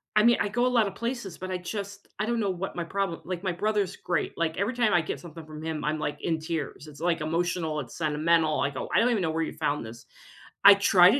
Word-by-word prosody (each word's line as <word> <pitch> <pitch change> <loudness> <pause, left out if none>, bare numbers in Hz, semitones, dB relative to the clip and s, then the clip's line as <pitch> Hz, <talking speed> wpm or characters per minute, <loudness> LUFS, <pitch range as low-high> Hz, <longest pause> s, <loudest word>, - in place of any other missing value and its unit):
I 215 - +6
mean, 235 0 +6
I 205 - +1
go 240 +4 +1
a - - +4
lotta 230 -5 +3
places, 235 -1 -4
but 185 +1 -6
I 185 - 0
just 200 +2 -6
I 215 - +1
don't 235 0 0
know 200 - +1
what 185 +1 -4
my 175 - -2
problem 190 0 -2
Like, 185 0 -5
my 185 -2 0
brother's 205 0 0
great. 175 - -2
Like, 165 -1 -1
every 205 +6 0
time 235 -4 +2
I 175 - +5
get 155 - -5
something 165 -2 -10
from 155 0 -9
him, 160 -2 -3
I'm 155 0 0
like 145 -1 -2
in 165 -1 0
tears. 155 -2 -4
It's 145 -1 -12
like 170 -1 +1
emotional. 165 -1 -1
It's 125 -4 -7
sentimental. 155 0 +2
I 140 - +1
go, 130 - -5
"I - - +5
don't 245 - +4
even 220 -5 +1
know 160 -2 0
where 165 0 0
you - - -4
found 150 -5 -1
this." 115 +1 -10 0.6
I 200 - +12
try 190 -2 +6
to 265 - +2
175 Hz, 270 wpm, -27 LUFS, 155-200 Hz, 0.6 s, I